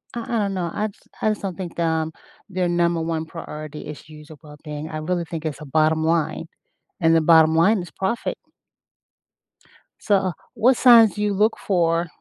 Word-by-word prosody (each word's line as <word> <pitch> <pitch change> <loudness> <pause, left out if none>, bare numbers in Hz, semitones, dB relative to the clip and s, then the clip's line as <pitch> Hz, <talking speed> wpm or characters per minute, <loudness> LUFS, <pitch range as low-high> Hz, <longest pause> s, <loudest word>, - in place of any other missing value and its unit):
I 235 - -3
I - - +2
don't 200 -1 -1
know, 170 -2 -2
I 215 +1 -1
just 200 - -17
I 215 - +2
just - - -17
don't 185 -4 -4
think 175 -3 -6
that, 170 - +1
um, 160 -1 0 0.4
their 180 -1 -1
number 170 -1 +1
1 160 -1 -2
priority 155 -2 -8
is 150 -1 -8
issues 155 0 -14
of 150 - -13
well-being. 150 0 -8
I 155 - -5
really 175 0 -1
think 165 -1 -6
it's 155 -1 -4
a - - -7
bottom 155 +1 +3
line, 160 0 0 0.5
and 165 0 +4
the 165 - +4
bottom 160 0 +6
line 195 +6 +4
is 175 - -9
profit. 230 +5 -1 1.6
So, 195 -4 +1 0.2
what 250 +2 +3
signs 230 -4 +7
do 210 - -4
you 205 -1 +1
look 210 +3 +2
for 170 -2 0
170 Hz, 195 wpm, -22 LUFS, 160-195 Hz, 1.6 s, signs